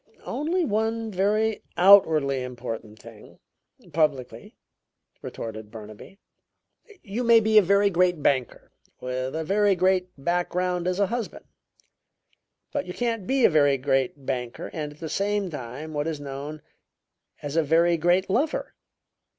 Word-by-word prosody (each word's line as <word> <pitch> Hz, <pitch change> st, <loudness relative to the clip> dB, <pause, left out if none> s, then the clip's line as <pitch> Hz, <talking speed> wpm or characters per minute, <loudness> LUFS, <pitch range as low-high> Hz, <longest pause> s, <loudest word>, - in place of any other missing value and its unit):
"Only 335 Hz, +4 st, -1 dB
one 220 Hz, 0 st, -1 dB
very 210 Hz, +3 st, 0 dB
outwardly 160 Hz, -8 st, +5 dB
important 120 Hz, -4 st, -7 dB
thing -, -, -15 dB, 0.6 s
publicly," 145 Hz, -5 st, -1 dB, 0.6 s
retorted 110 Hz, -1 st, -7 dB
Burnaby. 110 Hz, -, -11 dB, 0.9 s
"You 220 Hz, +4 st, -4 dB
may 230 Hz, -1 st, +6 dB
be 220 Hz, 0 st, +5 dB
a -, -, +5 dB
very 200 Hz, +2 st, +3 dB
great 180 Hz, -3 st, +1 dB
banker 130 Hz, -3 st, -1 dB, 0.3 s
with 130 Hz, +2 st, -4 dB
a 160 Hz, -, -2 dB
very 200 Hz, +3 st, +2 dB
great 185 Hz, 0 st, +1 dB
background 175 Hz, +3 st, -1 dB
as 185 Hz, +1 st, -1 dB
a 200 Hz, -, +4 dB
husband, 235 Hz, +3 st, -5 dB, 1.3 s
but 285 Hz, -, -3 dB
you 180 Hz, -, -6 dB
can't 230 Hz, -5 st, -2 dB
be 265 Hz, -2 st, +3 dB
a -, -, +6 dB
very 145 Hz, -3 st, +4 dB
great 135 Hz, 0 st, -1 dB
banker 125 Hz, -3 st, -4 dB
and 150 Hz, -2 st, -4 dB
at 150 Hz, -, -22 dB
the 165 Hz, -, -5 dB
same 200 Hz, +1 st, -1 dB
time 145 Hz, +3 st, -7 dB
what 145 Hz, +1 st, -2 dB
is 160 Hz, -3 st, -3 dB
known 145 Hz, +2 st, -7 dB, 0.8 s
as 145 Hz, +1 st, -5 dB
a 165 Hz, -, +4 dB
'very 165 Hz, +3 st, +3 dB
great 175 Hz, +3 st, +2 dB
lover.' 310 Hz, -, -1 dB
170 Hz, 140 wpm, -25 LUFS, 140-205 Hz, 1.3 s, may